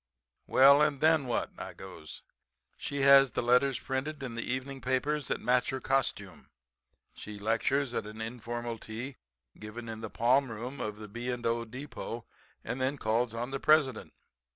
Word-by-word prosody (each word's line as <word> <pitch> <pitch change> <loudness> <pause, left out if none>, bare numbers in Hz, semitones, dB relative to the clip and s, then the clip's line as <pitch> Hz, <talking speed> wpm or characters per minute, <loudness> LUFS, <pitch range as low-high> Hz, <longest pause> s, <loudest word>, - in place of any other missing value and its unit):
"'Well 140 +2 +7
and 150 -2 +2
then 155 -3 +4
what?' 120 - -1
I - - -7
goes. - - -10 0.5
'She 140 -1 -4
has 135 -1 +7
the - - -1
letters 125 +2 +4
printed 140 +2 -3
in 125 -3 -4
the 115 - -3
evening 130 +2 -4
papers 135 +3 0
that - - -1
match 125 0 +2
her 130 - -2
costume, 110 -9 -2 0.6
she 105 -1 -9
lectures 120 +5 0
at 105 - -2
an 110 +1 -9
informal 120 0 -5
tea 120 +6 -7 0.4
given 110 +2 -8
in 110 -1 -6
the 110 - -5
palm 130 +5 +2
room 120 +5 -6
of 105 -1 -4
the 105 0 -8
B. 120 +4 -4
& 120 -1 -5
O. 115 0 0
Depot 120 -1 -7 0.4
and 130 - -4
then 135 +2 0
calls 115 0 0
on 120 +3 -3
the 135 - -2
President. 145 -7 +3
125 Hz, 175 wpm, -30 LUFS, 115-135 Hz, 0.6 s, Well